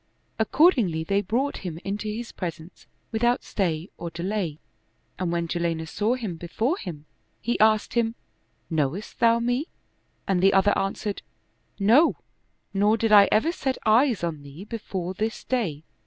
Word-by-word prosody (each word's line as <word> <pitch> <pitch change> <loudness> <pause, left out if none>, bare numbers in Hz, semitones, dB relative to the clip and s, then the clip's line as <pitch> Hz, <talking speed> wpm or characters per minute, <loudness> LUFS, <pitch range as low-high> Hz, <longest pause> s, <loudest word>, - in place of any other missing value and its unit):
Accordingly 220 - +3
they 200 +4 +1
brought 240 +9 -1
him 175 -4 -6
into 205 +2 -3
his 230 +2 -5
presence 170 -1 -7 0.2
without 240 +2 +1
stay 170 -3 -2
or 170 - -5
delay, 170 -2 -3 0.6
and 180 -2 -1
when 170 -1 -1
Jalinus 165 -1 -2
saw 220 +4 +1
him 215 -9 -5
before 220 - -1
him, 160 - -7 0.3
he 240 - -1
asked 215 0 +3
him, 230 -1 +1 0.3
" - - -43
Knowest 160 +5 -2
thou 230 -1 +5
me? 245 +6 0 0.3
" - - -43
and 185 -2 +2
the 195 +1 +5
other 195 +2 +4
answered, 200 +1 -2 0.3
" - - -39
No, 310 +6 +6 0.6
nor 205 +3 +3
did 225 -1 0
I 200 -2 +8
ever 225 +10 +3
set 265 -6 -2
eyes 230 -1 +4
on 160 -4 -2
thee 140 +5 -10
before 195 -5 -5
this 220 +4 -3
day." 180 - -2
205 Hz, 160 wpm, -25 LUFS, 170-230 Hz, 0.6 s, I